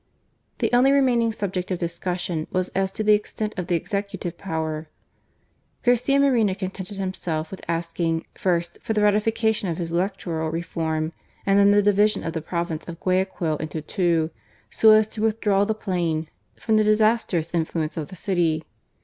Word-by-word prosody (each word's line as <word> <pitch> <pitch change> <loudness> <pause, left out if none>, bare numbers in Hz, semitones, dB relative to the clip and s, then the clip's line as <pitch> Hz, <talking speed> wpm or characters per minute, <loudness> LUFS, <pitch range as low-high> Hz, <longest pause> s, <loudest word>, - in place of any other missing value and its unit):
The - - -1
only 255 +3 +5
remaining 250 -5 +3
subject 190 -4 -3
of 185 - -1
discussion 170 -1 -3
was 185 -1 -1
as 190 0 -1
to 215 - -2
the 210 0 +5
extent 210 +1 -1
of 180 -3 -4
the 175 - +1
Executive 200 -1 -3
power. 160 -4 -3 1.0
Garcia 250 +3 +3
Moreno 235 -9 +3
contented 190 0 -6
himself 180 -5 -3
with 190 - -8
asking, 165 0 -1
first, 170 -2 -1
for 220 - -2
the 210 -1 +2
ratification 215 0 +2
of 165 - -2
his 170 -2 -4
electoral 170 -3 -1
reform, 160 -1 -2 0.3
and 195 0 +4
then 200 0 +6
the 205 0 +5
division 205 +1 +3
of 165 - -3
the 160 - -3
province 170 -1 -3
of 170 -1 -7
Guayaquil 185 -4 0
into 155 +1 -4
two, 165 0 0 0.4
so 220 - +5
as 215 0 +5
to 215 - -6
withdraw 210 -2 +2
the 220 +1 -1
plain 170 -6 -1 0.3
from 220 -1 +2
the 215 - +4
disastrous 215 -6 +2
influence 160 -1 -1
of 155 -3 -4
the 185 - -10
city. 170 -4 0
185 Hz, 165 wpm, -24 LUFS, 165-210 Hz, 1.0 s, then